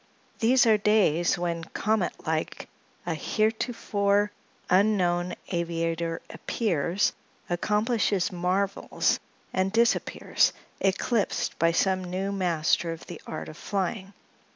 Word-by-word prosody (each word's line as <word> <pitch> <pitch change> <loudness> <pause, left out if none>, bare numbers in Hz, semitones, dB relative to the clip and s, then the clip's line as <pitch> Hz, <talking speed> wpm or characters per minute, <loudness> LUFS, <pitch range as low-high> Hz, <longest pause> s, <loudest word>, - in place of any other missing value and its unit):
These 240 +2 +5
are 220 -2 +5
days 185 -6 +3
when, 170 -1 -2
comet 210 +3 -1
like, 160 0 -2 0.4
a 175 - -1
heretofore 205 +1 0 0.4
unknown 180 -2 +2
aviator 165 -1 -2
appears, 180 -3 0 0.3
accomplishes 210 +1 +1
marvels 185 +2 0 0.3
and 190 +1 +1
disappears, 230 +2 +2 0.3
eclipsed 200 +3 0
by 165 0 +4
some 185 +2 +1
new 185 +2 -2
master 170 -3 +1
of 165 - -8
the - - -9
art 155 - -5
of 155 - -10
flying. 195 0 -3
190 Hz, 105 wpm, -27 LUFS, 170-210 Hz, 0.4 s, These